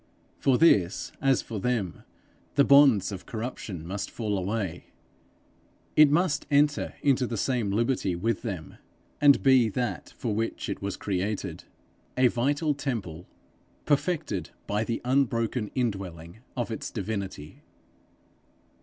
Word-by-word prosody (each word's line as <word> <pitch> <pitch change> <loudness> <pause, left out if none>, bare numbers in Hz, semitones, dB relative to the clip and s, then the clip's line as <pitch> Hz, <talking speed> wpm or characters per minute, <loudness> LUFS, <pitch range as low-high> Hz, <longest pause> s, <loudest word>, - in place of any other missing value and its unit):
For 130 -2 +3
this 100 - +3
as 135 -2 +3
for 110 -3 -5
them, 110 -6 -2 0.5
the 140 - +6
bonds 140 -9 +6
of 95 -2 -8
corruption 110 -7 -5
must 100 +3 -4
fall 105 -3 -2
away; 95 -2 -3 1.1
it 150 -1 +8
must 150 -1 +1
enter 145 +1 +2
into 130 -3 +3
the 115 - -3
same 120 -2 0
liberty 110 -3 0
with 105 +5 -1
them, 90 - -6 0.4
and 145 -1 +6
be 130 -4 +5
that 120 -3 -3
for 115 -4 -2
which 115 0 -2
it 100 - -4
was 100 -1 -3
created 100 +1 -3 0.5
a 130 -1 +5
vital 145 +6 +1
temple, 110 - -4 0.6
perfected 145 - 0 0.2
by 105 +2 0
the 115 0 -3
unbroken 120 -4 +1
indwelling 95 -7 -3 0.2
of 120 -1 -2
its 110 - -4
divinity. 100 -8 -5
115 Hz, 125 wpm, -27 LUFS, 100-135 Hz, 1.1 s, it